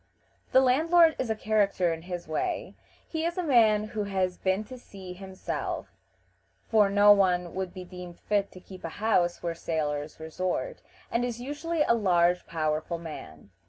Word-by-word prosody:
The 260 - +6
landlord 320 +6 +5
is 255 - -1
a 220 - +1
character 200 -5 +1
in 165 - -7
his 175 -1 -6
way. 155 - -2 0.3
He 320 -1 -3
is 340 +1 -1
a 365 - 0
man 225 -8 +4
who 210 -1 -3
has 185 -2 -1
been 190 +2 0
to 255 +3 -10
sea 190 -6 -10
himself, 190 0 -5 0.8
for 210 -3 +4
no 205 +1 +6
one 185 -3 +4
else 170 - -10
would 190 -1 -3
be 185 - -8
deemed 180 -1 -10
fit 205 -1 0
to 185 - -11
keep 185 0 -13
a 165 - -3
house 185 -5 +1
where 170 -1 -1
sailors 150 -3 -3
resort, 180 - -3 0.3
and 235 - +1
is 240 -1 -3
usually 295 +5 -1
a 235 - +3
large, 180 -5 +2
powerful 155 +1 -1
man. 100 - -10
190 Hz, 175 wpm, -28 LUFS, 175-225 Hz, 0.8 s, The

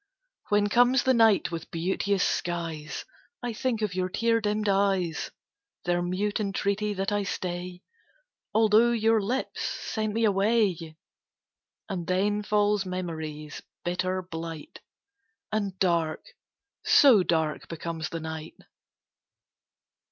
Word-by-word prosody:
When 205 0 +3
comes 245 +4 +4
the 260 - +4
night 225 -6 +4
with 165 -1 -6
beauteous 190 +3 0
skies, 165 -3 -3 0.4
I 240 -1 -2
think 225 -1 -1
of 205 -3 -1
your 185 0 -1
tear 230 +4 +1
dimmed 210 0 -1
eyes, 195 -4 +1 0.6
Their 175 0 +1
mute 190 +4 -1
entreaty 205 +1 -1
that 195 +1 -1
I 205 0 +1
stay, 180 -1 -4 0.7
Although 220 +2 +4
your 225 -1 +3
lips 245 +7 -2
sent 215 -1 -3
me 230 - +1
away; 195 -6 +1 0.9
And 180 -5 -4
then 205 +3 +1
falls 210 -1 +2
memory's 160 -5 -5 0.2
bitter 185 +1 -1
blight, 165 -3 -7 0.7
And 200 -3 -2
dark 170 -4 +1 0.6
so 255 -9 +7
dark 160 -3 0
becomes 165 -1 -4
the 165 - -5
night. 160 0 -6
195 Hz, 115 wpm, -27 LUFS, 170-210 Hz, 0.9 s, so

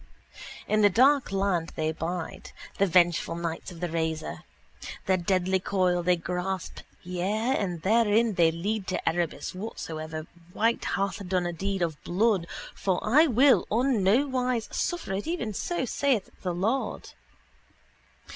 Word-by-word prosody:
In 215 0 +2
the 205 - +6
dark 265 +6 +4
land 190 -4 0
they 155 -1 0
bide, 165 +1 -5 0.3
the 200 - +4
vengeful 175 -2 +3
knights 170 +1 -4
of 170 -1 -11
the 175 - 0
razor. 160 -1 -2 0.7
Their 190 0 +3
deadly 185 +1 +1
coil 185 -2 +1
they 180 +1 +3
grasp: 180 +2 -4 0.2
yea, 200 +8 -1
and 175 - -2
therein 225 +1 +3
they 170 -3 +4
lead 195 +5 -3
to 185 - -3
Erebus 170 -1 -1
whatsoever 160 -6 -6 0.3
wight 230 +2 +1
hath 200 +1 -1
done 180 -1 0
a 175 - -2
deed 195 +2 -2
of 160 -3 -3
blood 190 -1 +1 0.3
for 190 -2 0
I 285 +9 +5
will 265 +1 +4
on 240 0 +2
nowise 250 +2 +1
suffer 345 - -2
it 195 +7 -3
even 325 -11 -2
so 345 - -2
saith 255 -4 0
the 180 -2 -2
Lord. 225 +9 -2
190 Hz, 145 wpm, -27 LUFS, 175-225 Hz, 0.7 s, the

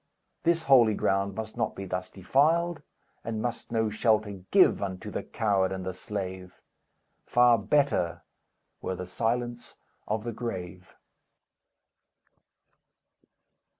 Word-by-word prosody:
This 165 -1 +2
holy 120 -7 +6
ground 100 0 0
must 110 -1 -5
not 115 -2 -1
be 95 - -6
thus 90 0 -4
defiled, 155 - +1 0.4
And 115 -1 -3
must 120 +1 -4
no 110 -2 +1
shelter 110 -1 +2 0.2
give - - +5
Unto 95 -2 -4
the - - -3
coward 100 -4 0
and 95 -1 -4
the 95 - -3
slave! 95 -2 -6 0.7
Far 120 -1 +5
better 105 - +1 0.6
were 95 - -3
the 90 0 -6
silence 120 +5 -2 0.3
of 105 0 -1
the 120 - -3
grave!" 95 -6 -6
110 Hz, 115 wpm, -28 LUFS, 95-120 Hz, 0.7 s, holy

